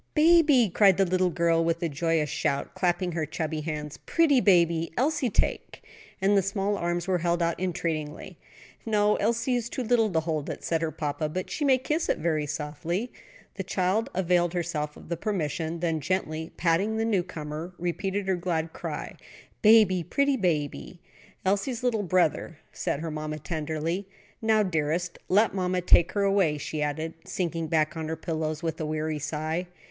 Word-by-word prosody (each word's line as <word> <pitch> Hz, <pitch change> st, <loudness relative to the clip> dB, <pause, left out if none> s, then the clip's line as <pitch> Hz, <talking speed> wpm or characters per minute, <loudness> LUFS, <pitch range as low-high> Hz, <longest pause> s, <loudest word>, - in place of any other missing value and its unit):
"Baby!" 305 Hz, -6 st, +6 dB
cried 195 Hz, -4 st, +5 dB
the 195 Hz, -, +4 dB
little 185 Hz, 0 st, +2 dB
girl, 170 Hz, -1 st, +2 dB
with 165 Hz, +1 st, 0 dB
a -, -, +2 dB
joyous 160 Hz, +1 st, 0 dB
shout, 140 Hz, -, -1 dB
clapping 180 Hz, -1 st, 0 dB
her 160 Hz, -2 st, -2 dB
chubby 155 Hz, 0 st, -3 dB
hands, 150 Hz, -1 st, -5 dB
"pretty 295 Hz, -6 st, +4 dB
baby 170 Hz, -5 st, +3 dB
Elsie 285 Hz, 0 st, +1 dB
take"; -, -, -2 dB, 0.4 s
and 200 Hz, +1 st, +3 dB
the 200 Hz, -, +5 dB
small 195 Hz, +2 st, -1 dB
arms 175 Hz, -1 st, -2 dB
were 185 Hz, -2 st, +1 dB
held 170 Hz, +1 st, +1 dB
out 170 Hz, 0 st, -1 dB
entreatingly. 165 Hz, -4 st, -3 dB, 0.4 s
"No, 210 Hz, -1 st, +2 dB
Elsie 235 Hz, +4 st, 0 dB
is 240 Hz, -1 st, -1 dB
too 255 Hz, -, -3 dB
little 230 Hz, -2 st, +3 dB
to 160 Hz, -2 st, +1 dB
hold 155 Hz, -3 st, -2 dB
it," -, -, -6 dB
said 165 Hz, -1 st, 0 dB
her 165 Hz, -, 0 dB
papa; 150 Hz, 0 st, -3 dB
"but 185 Hz, +4 st, -4 dB
she 300 Hz, -, -2 dB
may 270 Hz, -2 st, +5 dB
kiss 305 Hz, +6 st, -1 dB
it -, -, +2 dB
very 155 Hz, -2 st, 0 dB
softly." 155 Hz, -, -3 dB, 0.5 s
The -, -, -2 dB
child 190 Hz, +4 st, 0 dB
availed 175 Hz, -2 st, +2 dB
herself 155 Hz, -4 st, -2 dB
of -, -, -13 dB
the 170 Hz, -, -3 dB
permission, 165 Hz, -3 st, -2 dB
then 165 Hz, -2 st, 0 dB
gently 160 Hz, -1 st, -2 dB
patting 185 Hz, +6 st, +1 dB
the 225 Hz, -, 0 dB
newcomer, 175 Hz, -5 st, -3 dB
repeated 190 Hz, +3 st, -2 dB
her 190 Hz, -, +2 dB
glad 165 Hz, -2 st, -2 dB
cry, -, -, -5 dB, 0.5 s
"Baby, 210 Hz, -4 st, +6 dB
pretty 280 Hz, -, +1 dB
baby." 150 Hz, -, -2 dB, 0.5 s
"Elsie's 205 Hz, +6 st, 0 dB
little 235 Hz, -4 st, +1 dB
brother," 175 Hz, -4 st, +1 dB, 0.2 s
said 140 Hz, -, -2 dB
her 165 Hz, -1 st, -4 dB
mamma, 155 Hz, 0 st, -4 dB
tenderly. 160 Hz, +4 st, -3 dB, 0.3 s
"Now, 220 Hz, -1 st, +3 dB
dearest, 170 Hz, -1 st, -1 dB
let 210 Hz, +4 st, +4 dB
mammy 185 Hz, -1 st, 0 dB
take 175 Hz, -1 st, +5 dB
her 205 Hz, -, +1 dB
away," 195 Hz, -6 st, +2 dB
she 150 Hz, +1 st, -4 dB
added, 155 Hz, +2 st, -2 dB
sinking 165 Hz, -3 st, -2 dB
back 155 Hz, 0 st, +1 dB
on 160 Hz, -1 st, -4 dB
her 160 Hz, -, -2 dB
pillows 160 Hz, -1 st, -3 dB
with 165 Hz, -1 st, -2 dB
a -, -, -1 dB
weary 155 Hz, 0 st, -2 dB
sigh. 155 Hz, +4 st, -3 dB
175 Hz, 175 wpm, -27 LUFS, 160-200 Hz, 0.5 s, Baby